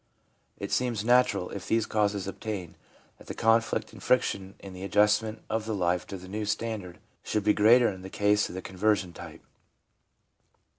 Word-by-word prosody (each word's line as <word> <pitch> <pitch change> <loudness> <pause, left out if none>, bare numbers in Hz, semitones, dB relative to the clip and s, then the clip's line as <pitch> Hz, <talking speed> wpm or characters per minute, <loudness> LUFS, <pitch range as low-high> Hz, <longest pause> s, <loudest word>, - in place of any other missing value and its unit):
It - - -6
seems 120 -4 0
natural, 125 -6 +3
if 100 - -7
these 115 -1 +2
causes 105 -2 0
obtain, 100 -3 -5 0.4
that - - -16
the - - -6
conflict 115 0 +1
and - - -12
friction 100 -6 0
in 95 -1 -11
the 90 - -9
adjustment 105 +3 +2
of 110 0 -2
life 90 -5 0
to 95 - -6
the 90 0 -12
new 105 +3 -4
standard 105 -4 -3 0.2
should 105 - -2
be 105 +1 +4
greater 115 +3 +5
in 95 -2 -7
the 95 - -8
case 105 +1 +2
of - - -8
the 95 - -6
conversion 95 -1 0
type. - - -11
105 Hz, 170 wpm, -28 LUFS, 95-110 Hz, 0.4 s, greater